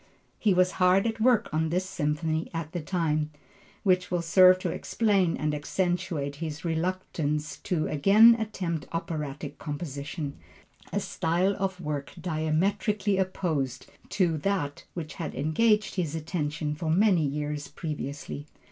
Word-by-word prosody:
He 210 - +3
was 185 0 +4
hard 185 +3 +5
at 225 -1 -2
work 235 -1 +4
on 160 +1 +1
this 180 +3 0
Symphony 155 0 -1
at 165 -1 -4
the 175 - -3
time, 155 -3 0 0.5
which 185 -1 +2
will 175 -2 0
serve 185 +2 +7
to 185 - -2
explain 200 -6 +1
and 150 0 -1
accentuate 160 -2 -1
his 160 +1 -5
reluctance 160 -3 -2
to 170 -5 -1
again 205 +10 +7
attempt 180 -8 -3
operatic 150 -4 -4
composition, 145 0 -5 0.5
a - - 0
style 180 +4 0
of 190 -1 -1
work 150 -4 -4
diametrically 185 +6 0
opposed 155 -9 -1 0.2
to 175 -5 +1
that 165 -5 -2
which 165 -3 -5
had - - -5
engaged 210 - +2
his 165 -4 -1
attention 150 -2 -2
for 155 +2 -3
many 185 0 +4
years 145 0 -2
previously. 145 -2 -5
165 Hz, 135 wpm, -28 LUFS, 150-185 Hz, 0.5 s, serve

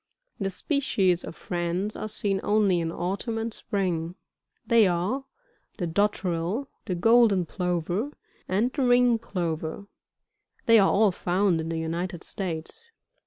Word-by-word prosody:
The 195 -2 -1
species 195 - +1
of - - -7
France 175 +4 -2
are - - -4
seen 205 -2 0
only 205 -4 +2
in 165 -1 -2
autumn 195 +7 -3
and 225 0 -3
spring; 180 -6 -2 0.5
they 230 -4 +5
are 185 +10 -1 0.5
the 180 - -2
Dotterel, 185 +4 0 0.2
the 185 - -2
Golden 220 -1 +4
Plover, 180 - -2 0.4
and 220 +7 +1
the 285 - -2
Ring 245 -2 +4
Plover; 170 -3 -3 0.8
they 230 -1 +7
are 195 - +5
all 210 0 +4
found 180 -1 +1
in 160 - -5
the 165 - -2
United 170 +2 -3
States. 185 - -5
190 Hz, 135 wpm, -26 LUFS, 175-220 Hz, 0.8 s, they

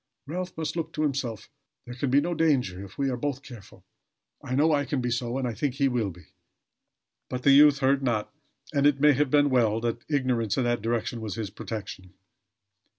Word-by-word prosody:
Ralph 180 +4 -5
must 160 0 -3
look 165 -1 -4
to 155 - -1
himself. 130 -7 -2 0.4
There 120 - -8
can 130 +2 -2
be 135 +2 +5
no 175 +3 -2
danger 130 - +1
if 100 0 -13
we 135 -1 0
are - - -1
both 140 +1 -3
careful. 120 -8 -13 0.6
I 130 - -3
know 155 +4 +3
I 145 -1 +2
can 140 0 -2
be 120 -1 -2
so; 120 +1 -2
and 130 -2 -1
I 120 - -3
think 130 +4 -2
he 140 0 +2
will 120 -5 0
be." 90 -3 -15 1.0
But 125 0 -4
the 140 - +6
youth 145 +1 +7
heard 135 +1 +3
not; 120 -4 -1 0.4
and 140 0 +4
it 145 -2 +2
may 150 +1 +6
have 145 +1 +1
been 145 0 +3
well 115 -4 +2
that 120 0 -2
ignorance 130 -7 0
in 130 - +2
that 120 -2 0
direction 115 +1 -2
was 110 -3 -4
his 110 -3 -4
portion. 100 -4 -7
130 Hz, 215 wpm, -26 LUFS, 115-145 Hz, 1.0 s, youth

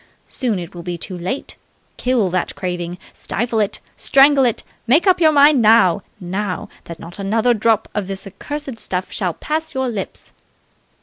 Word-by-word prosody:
Soon 240 -6 -1
it 170 -2 -7
will 175 - -8
be 175 0 -4
too 185 +3 -6
late! 180 +11 -5 0.4
Kill 245 -7 +1
that 185 -1 -1
craving! 175 -1 -4 0.2
Stifle 230 0 -2
it! 210 0 0 0.2
Strangle 275 0 +5
it! 235 - 0 0.2
Make 290 - +4
up 370 -2 +4
your 315 -1 +6
mind 290 -2 +6
now 215 -6 +5 0.2
now, 190 +1 -4 0.2
that 170 - -8
not 170 +4 -11
another 220 +5 +2
drop 220 -1 +1
of 205 -3 -2
the 195 -1 -4
accursed 270 +6 -6
stuff 185 -2 -3
shall 180 -4 -2
pass 315 -1 -3
your 265 -1 0
lips... 205 -5 -6
215 Hz, 170 wpm, -19 LUFS, 185-265 Hz, 0.4 s, your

